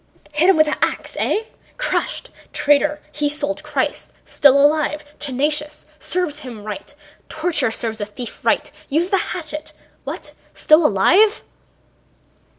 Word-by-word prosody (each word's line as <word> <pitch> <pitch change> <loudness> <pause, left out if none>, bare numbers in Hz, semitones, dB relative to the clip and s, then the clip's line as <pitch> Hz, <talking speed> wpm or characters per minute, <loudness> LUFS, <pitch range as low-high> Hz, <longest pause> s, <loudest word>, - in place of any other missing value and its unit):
"Hit 305 +5 +3
him 385 - +5
with 310 0 +5
an 300 - -1
ax, - - -1
eh!... 435 - +1 0.3
Crushed?... - - -2 0.2
Traitor, 295 +1 +2
he 295 -1 0
sold 295 0 -2
Christ.... 295 -3 -2
Still 280 -1 +5
alive... 300 +1 +2
tenacious... 295 +2 -2
serves 345 -5 -2
him 240 -7 -9
right! 215 +8 -7 0.3
Torture 310 -6 0
serves 225 -1 -3
a 205 - -2
thief 230 +3 -8
right. - - +1 0.2
Use 325 +5 +1
the 390 - +2
hatchet!... 310 -3 -5 0.3
What—still 310 +2 +1
alive?" 360 - +4
300 Hz, 130 wpm, -20 LUFS, 280-310 Hz, 0.3 s, him